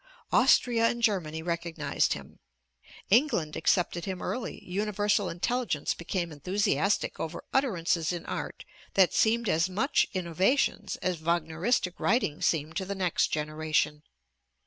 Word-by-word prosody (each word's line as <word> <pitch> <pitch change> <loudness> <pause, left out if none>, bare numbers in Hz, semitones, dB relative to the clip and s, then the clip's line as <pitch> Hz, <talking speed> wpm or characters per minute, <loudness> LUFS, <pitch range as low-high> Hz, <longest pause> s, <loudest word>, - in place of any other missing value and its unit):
Austria 230 -2 +4
and 240 - -3
Germany 160 -8 0
recognized 170 -1 -1
him, - - -10 0.7
England 220 - +3
accepted 175 +1 +1
him 190 -2 -4
early, 245 -1 -5
universal 205 +1 0
intelligence 175 - -1
became 170 0 -3
enthusiastic 195 +6 0
over 165 +1 -5
utterances 180 - +1
in 175 -1 -5
art - - -5 0.3
that 190 -2 +5
seemed 230 +1 +2
as 165 +1 +2
much 220 +10 +1
innovations 185 - +1
as 180 -2 0
Wagneristic 170 +4 0
writing 200 - +1
seemed 160 0 0
to 190 - -2
the 200 +1 -4
next 185 -2 +1
generation. 155 -1 -1
180 Hz, 125 wpm, -28 LUFS, 165-210 Hz, 0.7 s, that